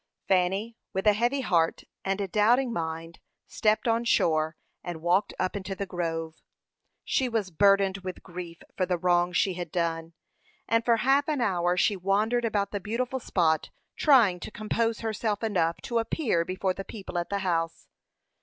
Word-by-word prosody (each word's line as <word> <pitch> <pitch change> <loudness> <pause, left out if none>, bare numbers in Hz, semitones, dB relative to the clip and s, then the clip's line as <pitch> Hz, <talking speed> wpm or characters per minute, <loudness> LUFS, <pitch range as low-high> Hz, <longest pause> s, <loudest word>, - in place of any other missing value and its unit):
Fanny, 195 +5 +1 0.2
with 190 +2 -2
a 210 - +6
heavy 240 +6 +1
heart 170 -9 +1 0.2
and 195 +1 -1
a 200 - -1
doubting 235 +6 +3
mind, 165 -1 -4 0.3
stepped 215 +3 +1
on 230 +1 +2
shore, 160 -8 +2 0.3
and 175 -2 -5
walked 185 +4 +2
up 185 +1 -1
into 195 -1 -4
the 200 - -3
grove. 165 -3 -4 0.6
She 260 -2 0
was 215 -5 -1
burdened 195 +2 +3
with 185 -1 -7
grief 175 -2 -8
for 185 - 0
the 180 -1 0
wrong 175 0 +2
she 185 +1 +1
had 175 -2 -6
done, 165 -1 -2 0.5
and 230 0 +2
for 230 -1 +3
half 270 +5 +3
an 300 -3 0
hour 180 -5 +1
she 205 +3 +3
wandered 210 +6 +1
about 205 -3 0
the 205 - -2
beautiful 245 +6 -2
spot, 165 -9 +1 0.3
trying 235 - +5
to - - -7
compose 225 +1 -1
herself 220 -1 -2
enough 175 -6 +1
to 240 -3 0
appear 225 - 0
before 185 +1 -1
the 195 - -6
people 190 -4 -6
at 170 - -4
the 200 - -1
house. 165 -2 -1
195 Hz, 175 wpm, -27 LUFS, 175-225 Hz, 0.6 s, a